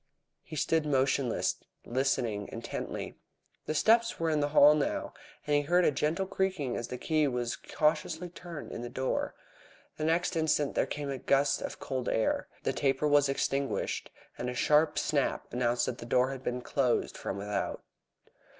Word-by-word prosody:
He - - -9
stood 160 +2 +1
motionless, 135 -3 +1 0.3
listening 120 -5 0
intently. - - -5 0.5
The 155 - -1
steps 230 +7 +3
were 165 -1 +1
in 155 - +2
the 145 - +2
hall 145 0 +7
now, 150 -2 -1 0.3
and 150 - +2
he 145 - +4
heard 175 +4 +3
a - - +4
gentle 150 +7 0
creaking 190 -9 -1
as 120 - -3
the 125 - -5
key 155 +3 +1
was 120 -2 -1
cautiously 160 +3 -1
turned 170 -3 -8
in - - -5
the 120 - -5
door. 130 +2 -2 0.6
The 155 - -3
next 165 +3 +1
instant 155 -3 +1
there - - +1
came 145 -1 -4
a 135 - -4
gust 140 +1 +2
of - - -5
cold 130 -2 -3
air, 110 - 0 0.2
the - - 0
taper 135 +1 +1
was 145 -1 +4
extinguished, 135 0 -1 0.3
and 125 - -2
a 125 - -4
sharp 150 +4 +3
snap 140 -3 0
announced 120 -1 +1
that 125 - -4
the 120 - -8
door 125 +2 +3
had 135 -2 -6
been 125 -1 -3
closed 125 -1 0
from 95 - -4
without. 100 0 -3
140 Hz, 175 wpm, -30 LUFS, 125-155 Hz, 0.6 s, hall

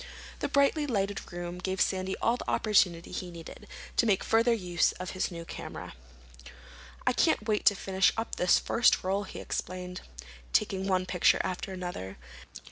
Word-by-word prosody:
The - - -1
brightly 280 +2 +3
lighted 205 -5 -2
room 175 0 -5
gave 190 +1 -3
Sandy 190 0 0
all 230 - +2
the - - -6
opportunity 180 -6 +2
he 180 - -4
needed 170 -2 -10 0.3
to - - +4
make 195 -3 +2
further 230 +2 +3
use 180 -6 +1
of 185 0 -6
his 185 - -1
new 170 -2 -7
camera. - - -7 1.1
"I - - +3
can't 215 - +2
wait 210 -1 0
to 205 - +6
finish 190 0 +2
up 225 - -3
this 180 - +4
first 240 - +3
roll," 195 +2 0
he - - -8
explained, 180 0 -5 0.5
taking 190 - +1
one 185 -1 +1
picture 180 -1 +3
after 185 +1 -4
another. 175 - -6
190 Hz, 165 wpm, -29 LUFS, 180-210 Hz, 1.1 s, to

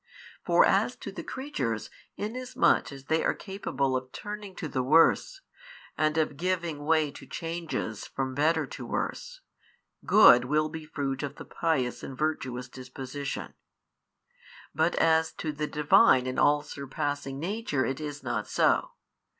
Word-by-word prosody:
For - - +5
as - - +2
to - - -8
the - - -6
creatures, 130 - -4 0.3
inasmuch 245 -1 +1
as 135 -1 -10
they 160 +4 +1
are - - +1
capable 165 -9 -2
of 130 0 -4
turning 205 -2 -7
to 160 - -5
the 130 -3 -1
worse, 165 - +3 0.5
and 155 0 +1
of 155 -3 0
giving 170 -4 -2
way 155 -2 +2
to - - -12
changes 165 - -4
from 130 -1 -3
better 160 +4 +2
to - - -8
worse, - - -4 0.6
good 125 - +7
will 155 +3 +1
be 160 0 -7
fruit 140 -3 -3
of 145 0 -4
the - - -10
pious 135 -7 -1
and 135 - -8
virtuous 130 -5 -2
disposition: 130 +2 -6 1.2
but 160 +2 +1
as 160 0 +3
to 155 - -4
the 150 0 -3
Divine 145 -4 +5
and 130 0 -2
All 145 0 +4
Surpassing 140 -1 -4
Nature 175 -6 -1
it 135 +2 -2
is 145 -2 -6
not 120 -4 -2
so. - - +2
150 Hz, 150 wpm, -28 LUFS, 135-165 Hz, 1.2 s, good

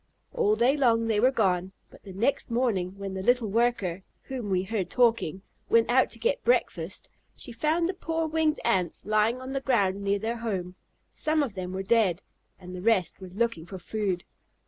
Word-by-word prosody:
All 210 +1 +2
day 240 +5 +3
long 230 -5 +3
they 220 -2 +1
were 250 +4 +5
gone, 190 -6 0 0.2
but - - -16
the 195 - -11
next 225 +10 0
morning 210 -6 0
when 195 -1 -5
the 190 - -4
little 245 +1 +2
worker 210 -6 +1 0.2
(whom 255 -6 -5
we 185 -1 +1
heard 190 -2 -2
talking) 225 -7 +1 0.3
went 230 0 +4
out 260 +1 +4
to - - -8
get - - -1
breakfast, - - 0 0.3
she 250 - -7
found 310 +8 +1
the 375 - -2
poor 325 -3 -2
winged 315 -1 +1
Ants 180 -3 0
lying 215 +3 +2
on 260 +1 -7
the 270 0 -2
ground 200 -7 +1
near 200 0 +1
their 225 +3 -3
home. 190 -6 -3 0.4
Some 310 -1 +1
of 250 -7 -4
them 185 -2 -5
were 190 +1 -3
dead, 195 -4 +2 0.3
and 180 -1 -10
the 180 - -6
rest 200 -3 +1
were 185 - -8
looking 190 -4 -2
for 190 - -7
food. 190 -1 -2
220 Hz, 195 wpm, -27 LUFS, 190-250 Hz, 0.4 s, were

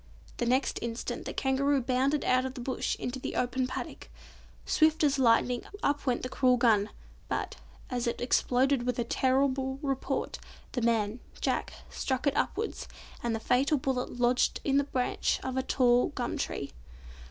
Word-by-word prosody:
The 240 - -1
next 255 +2 +1
instant 235 0 -4
the - - -3
Kangaroo 275 +1 +2
bounded 260 +3 +1
out 255 0 +3
of 260 0 -4
the - - -6
Bush 255 +2 -2
into 250 +1 -4
the - - -5
open 255 +1 0
paddock. - - -6 0.6
Swift 315 0 +3
as 280 -2 +3
lightning 245 0 +3 0.2
up 285 0 0
went 245 -1 +1
the - - -1
cruel 255 -1 +3
gun, 215 -4 +3 0.4
but, - - -3 0.3
as 245 -1 -1
it 235 - -1
exploded 255 +2 +2
with 250 0 -1
a 240 - +1
terrible 265 +2 +1
report, 270 -2 -2 0.3
the 250 - -2
man, 225 -1 +1 0.2
Jack, - - -1 0.2
struck 260 0 -2
it 280 - +2
upwards, - - -2 0.3
and 235 -1 -1
the - - -3
fatal 270 +6 +2
bullet 255 -2 -2
lodged 245 +1 +2
in 275 -1 +2
the 280 - +3
branch 255 -3 0
of 260 -1 -3
a 260 - +1
tall 250 -2 +3
gum - - -3
tree. - - -3
255 Hz, 170 wpm, -29 LUFS, 245-270 Hz, 0.6 s, out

